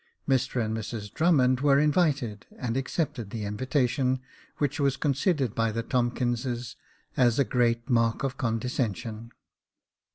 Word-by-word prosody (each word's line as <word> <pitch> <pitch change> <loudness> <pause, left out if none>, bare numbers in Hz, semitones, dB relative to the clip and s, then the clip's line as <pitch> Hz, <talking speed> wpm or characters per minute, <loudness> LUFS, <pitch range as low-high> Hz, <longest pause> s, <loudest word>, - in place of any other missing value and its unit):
Mr 130 -1 +1
and 110 +1 -2
Mrs 110 -2 -5
Drummond 130 -7 +3
were 140 -1 +5
invited, 145 - +1
and 120 -2 -3
accepted 135 - -2
the 110 0 -4
invitation, 130 +4 0 0.4
which 145 +1 -1
was 140 -1 +2
con 145 - +1
sidered 140 - 0
by 115 -1 +1
the 115 +1 -2
Tomkinses 120 -1 -1 0.4
as 120 -3 +3
a 140 - +5
great 120 -2 +1
mark 115 -2 +2
of 135 -1 -1
condescension. 115 -2 -2
125 Hz, 135 wpm, -27 LUFS, 115-135 Hz, 0.4 s, were